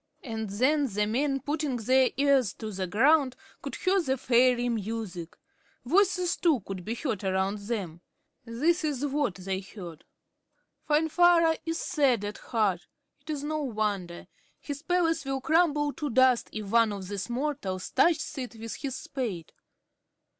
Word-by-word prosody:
And 220 Hz, -4 st, -4 dB
then 275 Hz, +8 st, +2 dB
the 210 Hz, -2 st, 0 dB
men, 270 Hz, +5 st, 0 dB
putting 295 Hz, -2 st, -2 dB
their 255 Hz, +3 st, +3 dB
ears 275 Hz, -6 st, +3 dB
to 220 Hz, -1 st, -6 dB
the 190 Hz, -1 st, -3 dB
ground, 265 Hz, -, +3 dB, 0.3 s
could -, -, -5 dB
hear 385 Hz, 0 st, +2 dB
fairy 250 Hz, -3 st, +2 dB
music. 215 Hz, -6 st, -4 dB, 0.5 s
Voices, 360 Hz, +3 st, +2 dB
too, 315 Hz, -9 st, +2 dB
could 190 Hz, -1 st, -7 dB
be 225 Hz, +5 st, -3 dB
heard 230 Hz, -6 st, -3 dB
around 190 Hz, +2 st, 0 dB
them. 200 Hz, -6 st, -4 dB, 0.4 s
This 300 Hz, +10 st, 0 dB
is 290 Hz, -3 st, -1 dB
what 280 Hz, -7 st, 0 dB
they 190 Hz, 0 st, -3 dB
heard: 185 Hz, -5 st, -10 dB, 0.9 s
"Finvarra 325 Hz, +2 st, +4 dB
is 330 Hz, 0 st, -1 dB
sad 260 Hz, -11 st, +1 dB
at 205 Hz, -, -6 dB
heart. 205 Hz, -7 st, -1 dB, 0.3 s
It 285 Hz, +3 st, -19 dB
is 295 Hz, -2 st, -3 dB
no 310 Hz, +1 st, -2 dB
wonder. 210 Hz, -9 st, -2 dB, 0.3 s
His 285 Hz, -1 st, -6 dB
palace 330 Hz, -2 st, +1 dB
will 270 Hz, -1 st, -2 dB
crumble 295 Hz, -1 st, +2 dB
to 300 Hz, -2 st, -4 dB
dust, 255 Hz, 0 st, +3 dB
if 210 Hz, -2 st, -6 dB
one 230 Hz, -1 st, +4 dB
of 195 Hz, -2 st, -6 dB
these 200 Hz, +3 st, -4 dB
mortals 240 Hz, -8 st, -3 dB
touches 335 Hz, -2 st, +2 dB
it 250 Hz, -2 st, -6 dB
with 225 Hz, 0 st, -7 dB
his 275 Hz, -3 st, -4 dB
spade." 220 Hz, -, -5 dB
250 Hz, 150 wpm, -28 LUFS, 205-295 Hz, 0.9 s, Finvarra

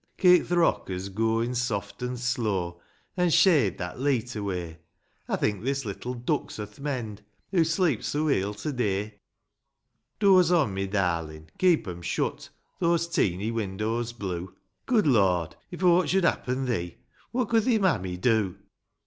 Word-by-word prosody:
Keep 180 Hz, -1 st, +5 dB
th' 175 Hz, -, -2 dB
rockers 95 Hz, -, +1 dB
gooin' 115 Hz, +4 st, 0 dB
soft 120 Hz, -2 st, -3 dB
and 125 Hz, 0 st, -3 dB
slow, 105 Hz, -9 st, -1 dB, 0.3 s
An' 180 Hz, -1 st, +2 dB
shade 145 Hz, -, +4 dB
that 90 Hz, +6 st, -6 dB
leet 125 Hz, -4 st, 0 dB
away; 90 Hz, -5 st, -4 dB, 0.5 s
I -, -, 0 dB
think 105 Hz, -1 st, -1 dB
this 135 Hz, 0 st, -1 dB
little 120 Hz, +5 st, -5 dB
duck's 120 Hz, 0 st, -2 dB
o'th 105 Hz, +1 st, -8 dB
mend, 120 Hz, -8 st, -4 dB, 0.3 s
Hoo 180 Hz, -4 st, +4 dB
sleeps 160 Hz, -, 0 dB
so 150 Hz, +2 st, -1 dB
weel 105 Hz, -8 st, 0 dB
to 145 Hz, +8 st, -4 dB
day; 105 Hz, -3 st, -2 dB, 1.0 s
Doze 185 Hz, -4 st, +5 dB
on, 155 Hz, -, +3 dB
ray 95 Hz, 0 st, -2 dB
darlin'; 85 Hz, -5 st, -2 dB
keep 175 Hz, -, +3 dB
'em 90 Hz, -1 st, -6 dB
shut, -, -, -2 dB
— -, -, -44 dB
Those 170 Hz, -1 st, +2 dB
teeny' 105 Hz, -, 0 dB
windows 110 Hz, +2 st, -2 dB
blue; 95 Hz, -5 st, -5 dB, 0.3 s
Good 225 Hz, -5 st, +3 dB
Lord; 95 Hz, -, +2 dB
if 175 Hz, +1 st, -7 dB
aught 180 Hz, 0 st, +4 dB
should 190 Hz, 0 st, +2 dB
happen 130 Hz, -5 st, 0 dB
thee, 90 Hz, -9 st, -2 dB, 0.3 s
What 245 Hz, -2 st, -1 dB
could 225 Hz, -2 st, +3 dB
thi 240 Hz, -3 st, +3 dB
mammy 95 Hz, -, 0 dB
do 105 Hz, -2 st, +1 dB
115 Hz, 155 wpm, -27 LUFS, 95-155 Hz, 1.0 s, Keep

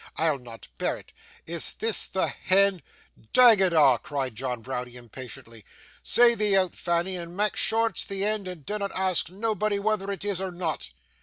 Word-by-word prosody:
'I'll 155 Hz, -4 st, +1 dB
not 120 Hz, -2 st, -12 dB
bear -, -, 0 dB
it. -, -, -17 dB, 0.3 s
Is 170 Hz, 0 st, -1 dB
THIS 225 Hz, -3 st, 0 dB
the 190 Hz, -, 0 dB
hend 195 Hz, -1 st, +2 dB, 0.3 s
' 110 Hz, -, -29 dB
'Dang 240 Hz, -5 st, +8 dB
it 190 Hz, -2 st, +3 dB
a',' 150 Hz, -5 st, +5 dB
cried 135 Hz, -4 st, -3 dB
John 125 Hz, 0 st, -4 dB
Browdie, 125 Hz, -1 st, -5 dB
impatiently. 115 Hz, -2 st, -10 dB, 0.4 s
'Say 240 Hz, 0 st, +5 dB
thee 210 Hz, -3 st, 0 dB
say -, -, +5 dB
out, 185 Hz, -2 st, +2 dB
Fanny, 175 Hz, +2 st, -1 dB
and 170 Hz, +1 st, -8 dB
mak' 210 Hz, 0 st, +1 dB
sure 225 Hz, +1 st, +2 dB
it's 205 Hz, -, -4 dB
the 195 Hz, 0 st, -2 dB
end, 210 Hz, -2 st, -1 dB
and 175 Hz, -6 st, -7 dB
dinnot 205 Hz, -1 st, -3 dB
ask 185 Hz, -3 st, +1 dB
nobody 210 Hz, +1 st, -1 dB
whether 200 Hz, -1 st, -1 dB
it 195 Hz, 0 st, -5 dB
is 200 Hz, -3 st, -2 dB
or 190 Hz, -, -2 dB
not. 170 Hz, -, -4 dB
185 Hz, 190 wpm, -26 LUFS, 140-205 Hz, 0.4 s, Dang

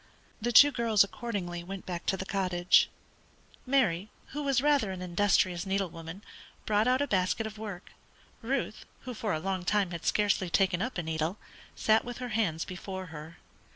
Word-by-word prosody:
The 240 Hz, +2 st, 0 dB
two 285 Hz, +5 st, +9 dB
girls 230 Hz, -5 st, +4 dB
accordingly 195 Hz, -5 st, -4 dB
went 195 Hz, +1 st, -7 dB
back 175 Hz, -2 st, -5 dB
to 190 Hz, -, +1 dB
the 190 Hz, -, -5 dB
cottage. 180 Hz, -2 st, +3 dB, 0.8 s
Mary, 215 Hz, -8 st, +2 dB, 0.2 s
who 295 Hz, -, -4 dB
was 275 Hz, -3 st, +2 dB
rather 285 Hz, -6 st, +3 dB
an 185 Hz, -, -6 dB
industrious 180 Hz, -1 st, +2 dB
needlewoman, 190 Hz, -2 st, -4 dB, 0.4 s
brought 215 Hz, +2 st, +2 dB
out 255 Hz, +2 st, +3 dB
a -, -, -2 dB
basket 195 Hz, +1 st, +1 dB
of 215 Hz, -1 st, -7 dB
work. 205 Hz, -4 st, -7 dB, 0.5 s
Ruth, 240 Hz, -2 st, -2 dB, 0.2 s
who 255 Hz, -, -6 dB
for 215 Hz, -2 st, -3 dB
a 155 Hz, -, 0 dB
long 185 Hz, +1 st, -2 dB
time 200 Hz, 0 st, +1 dB
had 170 Hz, -1 st, -6 dB
scarcely 200 Hz, -3 st, +2 dB
taken 185 Hz, 0 st, +2 dB
up 250 Hz, -1 st, -3 dB
a 175 Hz, -, -2 dB
needle, 160 Hz, +4 st, -2 dB, 0.4 s
sat 220 Hz, 0 st, +3 dB
with 245 Hz, 0 st, -6 dB
her 250 Hz, -1 st, -5 dB
hands 205 Hz, -8 st, 0 dB
before 190 Hz, +1 st, -6 dB
her. 155 Hz, +2 st, -9 dB
195 Hz, 175 wpm, -30 LUFS, 175-225 Hz, 0.8 s, two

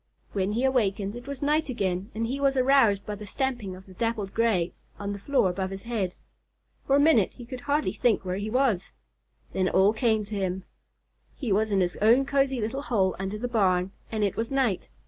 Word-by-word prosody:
When 195 Hz, 0 st, -1 dB
he 235 Hz, +4 st, 0 dB
awakened, 210 Hz, -6 st, +1 dB
it 240 Hz, +2 st, -9 dB
was 280 Hz, -1 st, -5 dB
night 300 Hz, +1 st, +1 dB
again 195 Hz, -4 st, -2 dB
and 225 Hz, +1 st, -1 dB
he 260 Hz, +4 st, -3 dB
was 275 Hz, -1 st, +2 dB
aroused 255 Hz, -6 st, +4 dB
by 210 Hz, -, -4 dB
the 205 Hz, 0 st, -8 dB
stamping 240 Hz, -5 st, -2 dB
of 190 Hz, +1 st, -13 dB
the 190 Hz, -, -14 dB
Dappled 215 Hz, -1 st, -2 dB
Gray 215 Hz, -7 st, +1 dB, 0.2 s
on 200 Hz, 0 st, -4 dB
the 200 Hz, -, -6 dB
floor 270 Hz, -1 st, +2 dB
above 190 Hz, +1 st, -2 dB
his 195 Hz, 0 st, -7 dB
head. 215 Hz, -6 st, -2 dB, 0.7 s
For 275 Hz, -, +4 dB
a -, -, +5 dB
minute 285 Hz, -, +4 dB
he 245 Hz, -, -11 dB
could 250 Hz, +1 st, -7 dB
hardly 290 Hz, +3 st, 0 dB
think 225 Hz, -5 st, +1 dB
where 185 Hz, 0 st, -2 dB
he 205 Hz, +2 st, -3 dB
was. 235 Hz, -6 st, +1 dB, 0.6 s
Then 185 Hz, -1 st, +1 dB
it -, -, -2 dB
all 195 Hz, +3 st, +5 dB
came 220 Hz, -2 st, +1 dB
to 210 Hz, -, -9 dB
him. 190 Hz, -1 st, -2 dB, 0.7 s
He 225 Hz, -, -3 dB
was 215 Hz, +3 st, +2 dB
in 195 Hz, -2 st, +2 dB
his 175 Hz, -1 st, 0 dB
own 235 Hz, +6 st, +4 dB
cozy 270 Hz, -2 st, +1 dB
little 230 Hz, +5 st, -2 dB
hole 210 Hz, -8 st, +1 dB
under 195 Hz, +2 st, -3 dB
the 245 Hz, +3 st, -3 dB
barn, 190 Hz, -5 st, +2 dB, 0.2 s
and 220 Hz, -2 st, -1 dB
it 200 Hz, -, 0 dB
was 225 Hz, 0 st, -2 dB
night. 260 Hz, -8 st, 0 dB
215 Hz, 220 wpm, -27 LUFS, 195-255 Hz, 0.7 s, a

